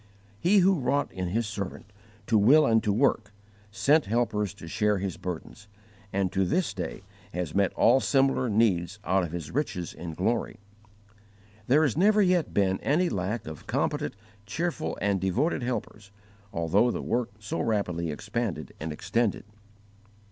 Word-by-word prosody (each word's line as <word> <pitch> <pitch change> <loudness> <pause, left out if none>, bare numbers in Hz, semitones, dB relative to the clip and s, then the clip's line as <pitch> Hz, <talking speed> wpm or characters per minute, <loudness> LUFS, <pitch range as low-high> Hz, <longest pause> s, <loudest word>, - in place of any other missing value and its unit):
He 195 +4 +4
who 190 -3 +4
wrought 140 +2 0
in 90 -1 -4
His 115 +6 0
servant 105 -3 -5 0.4
to 115 - +1
will 135 +9 +6
and 115 -3 +3
to 105 - +1
work, 110 -2 +1 0.4
sent 120 +10 +3
helpers 105 -3 0
to 85 - -11
share 105 +4 +1
his 95 -2 -3
burdens, 90 +4 -7 0.4
and 95 -2 0
to 95 0 +1
this 175 - 0
day - - -5 0.3
has 90 -4 -3
met 100 -1 +2
all 125 +3 +5
similar 135 -2 +2
needs 100 -4 +1
out 95 +1 +2
of 85 - -4
His 85 -4 -5
riches 105 - -2
in 85 -2 -7
glory. 110 +5 -1 1.1
There 145 +5 +5
has 140 -7 +1
never 210 +5 +4
yet 180 -3 +2
been 95 -1 +1
any 170 +5 +1
lack 100 +4 -2
of 80 -1 -9
competent, 75 - -1 0.3
cheerful, 165 +6 -2
and 100 -2 0
devoted 95 - 0
helpers, 120 -4 -4 0.4
although 90 +6 +2
the - - -3
work 120 -1 -1
so 105 -1 -3
rapidly 90 -7 -1
expanded 100 - -4
and 80 +1 -4
extended. 110 +8 -1
105 Hz, 155 wpm, -27 LUFS, 95-125 Hz, 1.1 s, will